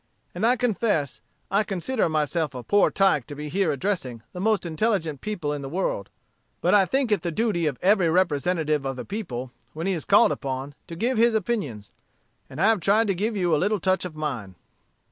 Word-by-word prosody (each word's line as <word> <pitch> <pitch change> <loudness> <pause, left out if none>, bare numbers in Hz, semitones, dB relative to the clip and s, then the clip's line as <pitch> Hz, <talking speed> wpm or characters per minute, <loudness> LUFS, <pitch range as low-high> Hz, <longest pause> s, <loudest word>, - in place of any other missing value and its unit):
And 195 +6 +1
I 245 - +4
confess, 210 - 0 0.3
I 200 +2 +3
consider 200 +2 -1
myself 155 -1 -1
a 125 - -6
poor 205 +8 +3
tyke 190 -10 +2
to 145 - -7
be 150 +1 -6
here 185 0 +1
addressing 135 - -3
the 180 - -6
most 215 0 +1
intelligent 165 - -1
people 180 -9 -3
in 145 - -4
the 135 - -6
world. 155 - -2 0.5
But 180 - +2
I 195 -2 +5
think 265 -1 0
it 205 -5 +2
the 175 - -2
duty 175 -2 0
of 140 -4 -2
every 190 -3 +4
representative 160 -3 +1
of 135 -1 -3
the 125 - -6
people, 130 - -5 0.2
when 160 +2 -5
he 195 - +1
is 165 - -3
called - - +5
upon, 135 0 -4
to 165 - -7
give 235 +6 0
his 235 0 +4
opinions. 170 - -2 0.6
And 130 - -9
I 190 - +3
have 225 -2 +3
tried 210 +4 +3
to - - +3
give 210 +4 -1
you 175 -4 +2
a 150 - 0
little 205 +2 +1
touch 185 +2 +1
of 180 -4 -6
mine." 125 -12 -4
175 Hz, 210 wpm, -25 LUFS, 145-205 Hz, 0.6 s, I